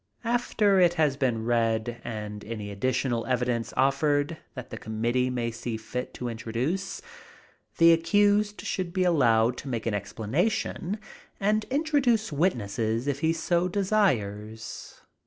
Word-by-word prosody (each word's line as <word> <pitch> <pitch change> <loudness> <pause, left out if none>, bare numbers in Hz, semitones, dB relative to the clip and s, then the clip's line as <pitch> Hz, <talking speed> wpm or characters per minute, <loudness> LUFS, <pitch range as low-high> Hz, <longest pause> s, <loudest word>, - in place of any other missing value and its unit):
After 225 -4 +2
it 175 -1 +4
has 150 -4 +2
been 120 -5 0
read 115 0 0
and 105 -2 -6
any 105 -2 -6
additional 120 +2 0
evidence 125 -2 0
offered 145 +4 +2 0.2
that 130 -2 -8
the 115 - -5
committee 120 +3 0
may 120 -2 -2
see 115 0 -4
fit 125 +3 -5
to 125 - -4
introduce, 125 - -3 0.7
the 165 0 +7
accused 205 +5 +2
should 180 -2 -3
be 185 -1 +1
allowed 125 -8 +3
to - - -8
make 115 -3 -3
an 115 - 0
explanation 150 - -1 0.4
and 210 +2 +1
introduce 270 - +1
witnesses 115 - 0
if 140 -1 -1
he 160 +1 +2
so 170 +2 +1
desires. 115 - -1
130 Hz, 135 wpm, -27 LUFS, 115-180 Hz, 0.7 s, the